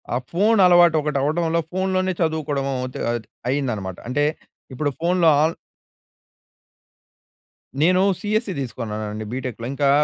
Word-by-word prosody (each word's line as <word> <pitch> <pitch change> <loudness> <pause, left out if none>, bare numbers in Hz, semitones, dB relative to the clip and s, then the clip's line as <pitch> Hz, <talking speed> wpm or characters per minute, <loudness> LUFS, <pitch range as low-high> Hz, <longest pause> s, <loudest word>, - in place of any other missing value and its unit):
ఆ - - +2
ఫోన్ 210 +5 +3
అలవాటు 175 -2 +6
ఒకటి 150 -1 -1
అవ్వడంలో, 165 +3 +1
ఫోన్‍లోనే 185 0 0
చదువుకోవడం 155 -4 -1
అవుతూ 125 0 -5
అది 120 -2 -4 0.2
అయిందనమాట 110 -10 -2
అంటే 145 +3 +1 0.5
ఇప్పుడు 145 +3 -1
ఫోన్‍లో 175 0 +2 0.2
ఆన్ 160 +1 +1 2.3
నేను 180 +3 +4 0.2
సిఎస్‌సి 215 -1 -1
తీసుకున్నానండి 110 -4 -5
బిటెక్‌లో. 125 -2 -5
ఇంకా 140 0 +1
150 Hz, 115 wpm, -22 LUFS, 125-175 Hz, 2.3 s, అలవాటు